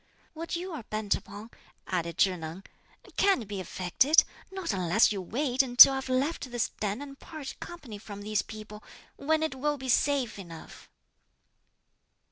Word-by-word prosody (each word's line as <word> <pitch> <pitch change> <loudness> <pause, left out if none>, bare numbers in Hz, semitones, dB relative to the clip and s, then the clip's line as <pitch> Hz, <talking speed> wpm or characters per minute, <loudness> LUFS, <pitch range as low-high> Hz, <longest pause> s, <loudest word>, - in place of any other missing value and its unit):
"What 330 +2 -5
you're 345 -4 -5
bent 215 -1 -1
upon," 215 +3 -7 0.3
added 170 -2 -3
Chih 190 -2 +3
Neng, 165 +2 -7 0.5
"can't 385 - +3
be 200 -1 -5
effected; 185 - +3 0.3
not 380 - -3
unless 185 +4 +3
you 200 -2 -3
wait 255 - 0
until 260 +1 +9
I've 265 0 -4
left 265 +2 -1
this 240 -1 -1
den 210 +5 -2
and 275 -1 -11
parted 310 -5 -8
company 270 -12 -9
from 205 -1 -9
these 210 0 0
people, 215 -1 -10 0.3
when 315 +2 +1
it 315 - -1
will 295 +3 -1
be 260 -1 -6
safe 260 -4 +1
enough." 170 -4 -11
240 Hz, 150 wpm, -29 LUFS, 205-285 Hz, 0.5 s, until